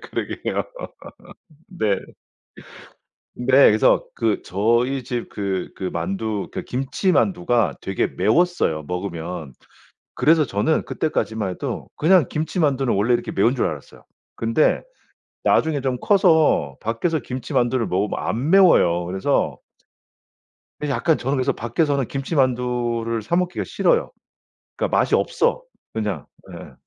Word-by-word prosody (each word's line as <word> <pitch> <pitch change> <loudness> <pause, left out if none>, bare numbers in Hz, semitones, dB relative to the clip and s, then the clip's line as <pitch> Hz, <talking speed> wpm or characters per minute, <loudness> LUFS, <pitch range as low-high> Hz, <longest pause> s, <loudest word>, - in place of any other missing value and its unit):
그러게요. - - -3 1.1
네. 110 - 0 1.4
네. 125 - -6 0.2
그래서 110 +1 +3
그 110 -2 0
저희 120 +7 +1
집 120 -1 -4
그 95 -3 -3
그 95 - -4
만두 100 +5 -3
그니까 - - -4
김치만두가 135 - +1
되게 - - -1
매웠어요 110 - +1
먹으면. 85 -4 -5 0.6
그래서 160 0 +4
저는 110 +10 0
그때까지만 110 -9 -2
해도 90 - -5
그냥 170 -2 +4
김치만두는 150 -5 0
원래 110 +5 +2
이렇게 120 - -2
매운 115 +6 +2
줄 130 - 0
알았어요. - - -8 0.3
근데 115 +7 +2 0.6
나중에 155 -4 +2
좀 130 -2 -1
커서 160 - +3
밖에서 135 +9 -1
김치만두를 125 -1 -1
먹으면 100 +3 -1
안 125 +8 -2
매워요. 90 - +5
그래서 95 +2 0 1.2
그래서 145 -2 -1
약간 155 +6 +2
저는 135 +3 -1
그래서 130 0 +1
밖에서는 135 +3 0
김치만두를 125 -5 -1
사 110 +11 -1
먹기가 180 0 -1
싫어요. 485 0 +1 0.7
그러니까 - - 0
맛이 - - +2
없어 - - +1 0.3
그냥. 105 -9 -3 0.3
예. - - -10
120 Hz, 285 characters per minute, -22 LUFS, 105-150 Hz, 1.4 s, 매워요